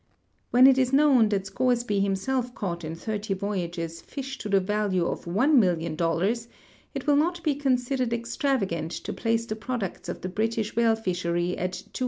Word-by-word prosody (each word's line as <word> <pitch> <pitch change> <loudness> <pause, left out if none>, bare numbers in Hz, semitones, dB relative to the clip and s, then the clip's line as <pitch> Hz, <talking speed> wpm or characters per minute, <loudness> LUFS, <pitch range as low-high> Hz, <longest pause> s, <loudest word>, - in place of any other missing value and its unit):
When 250 +1 +6
it 265 -1 +7
is 255 -1 +2
known 270 -6 +5
that 200 -2 0
Scoresl)y 235 0 0
himself 240 +6 -1
caught 175 -4 -4
in 160 +1 -5
thirty 210 +1 -3
voyages 175 -4 -3
fish 270 -1 -7
to 210 - -5
the 195 -1 +4
value 195 -2 0
of - - -3
$1,000,000, 180 - +2 0.5
it - - -4
will 295 -2 +4
not 345 +4 +1
be 305 - +2
considered 255 -2 0
extravagant 235 - -1
to - - -5
place 230 0 0
the 215 - -4
products 220 -3 -4
of - - -5
the 185 - -4
British 220 +2 -1
whale 230 -1 +4
fishery 175 -4 -1
at 180 0 -3
$250,000,000. 185 +7 -8
215 Hz, 170 wpm, -26 LUFS, 185-250 Hz, 0.5 s, it